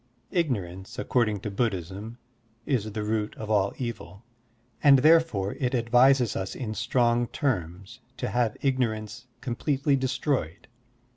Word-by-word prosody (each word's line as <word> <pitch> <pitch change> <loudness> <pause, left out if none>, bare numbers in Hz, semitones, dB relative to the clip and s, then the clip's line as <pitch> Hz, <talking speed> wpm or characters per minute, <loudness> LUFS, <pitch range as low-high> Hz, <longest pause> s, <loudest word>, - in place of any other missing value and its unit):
Ignorance, 95 - -2
according 105 -2 0
to 105 - -4
Buddhism, 100 +1 -3 0.5
is 110 -6 -1
the 105 -1 -3
root 105 0 -2
of 110 0 -6
all 100 -2 +2
evil, 115 -5 -6 0.6
and 140 -2 +7
therefore 150 -9 +3
it 130 -1 0
advises 125 +1 +4
us 95 0 -4
in 110 -5 -4
strong 120 +2 +1
terms 95 - -3 0.2
to - - -3
have 120 -3 0
ignorance 120 -3 -1
completely 135 +3 0
destroyed. 130 - -2
115 Hz, 125 wpm, -27 LUFS, 105-130 Hz, 0.6 s, and